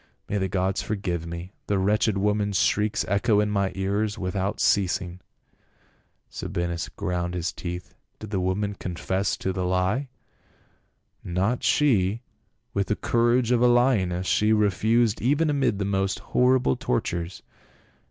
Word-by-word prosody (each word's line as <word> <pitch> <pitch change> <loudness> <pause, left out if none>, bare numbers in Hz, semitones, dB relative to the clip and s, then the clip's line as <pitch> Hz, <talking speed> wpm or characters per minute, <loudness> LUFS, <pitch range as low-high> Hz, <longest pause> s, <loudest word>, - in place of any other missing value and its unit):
May 105 - -1
the 95 - 0
gods 95 +1 0
forgive 90 -5 -3
me, 85 +3 -7
the 100 - +1
wretched 105 +2 +2
woman's 105 0 +1
shrieks 105 +3 +1
echo 105 +2 +2
in 105 0 +1
my 100 -2 +1
ears 100 +3 -1
without 95 +1 -2
ceasing." 90 -2 +1 1.1
Sabinus 85 -2 -3
ground 90 0 -3
his 90 -1 -2
teeth. 90 0 -6
" - - -47
Did 110 -1 -9
the 95 - 0
woman 95 +3 -1
con 90 -3 -6
fess 95 +6 -1
to 95 - -2
the 90 0 -2
lie 95 +9 0 0.4
?" - - -37
" - - -49 0.2
Not 95 +7 0
she; 115 -6 +2 0.5
with 100 -1 0
the 105 - +1
courage 120 +1 +2
of 120 -1 +3
a 125 - +6
lioness, 110 -8 +2
she 105 +3 +3
refused 110 +2 +2
even 150 +5 +2
amid 135 -7 +1
the 100 - -2
most 95 0 0 0.2
horrible 125 - +3
tortures. 85 +7 -2
100 Hz, 150 wpm, -25 LUFS, 90-110 Hz, 1.1 s, a